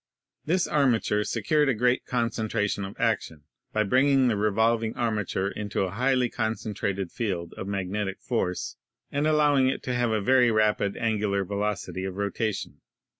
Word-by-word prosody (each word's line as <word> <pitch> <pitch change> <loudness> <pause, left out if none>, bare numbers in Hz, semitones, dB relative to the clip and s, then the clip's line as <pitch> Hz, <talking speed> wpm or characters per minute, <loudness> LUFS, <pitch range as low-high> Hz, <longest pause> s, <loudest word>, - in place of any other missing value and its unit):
This 175 +3 +1
armature 120 -7 +2
secured 150 +5 +1
a 130 - +2
great 125 +3 +1
concentration 110 -4 -1
of 95 - -8
action 75 -2 -1 0.3
by 110 - +1
bringing 130 +4 +3
the 110 - +1
revolving 110 +2 +1
armature 105 -5 -1
into 105 -2 -3
a 95 - -2
highly 125 +3 +2
concen 110 -1 -3
trated 100 -2 -2
field 90 -7 -3
of 95 - -6
magnetic 100 0 -3
force 110 -8 -2 0.3
and 145 +2 0
allowing 145 -4 +4
it - - -3
to 125 - -2
have 120 -1 +1
a 110 -1 +1
very 125 +4 +4
rapid 105 -2 +1
angular 105 -3 0
velocity 100 -1 -3
of 95 -1 -4
rotation. 100 +1 -3
110 Hz, 155 wpm, -26 LUFS, 100-125 Hz, 0.3 s, allowing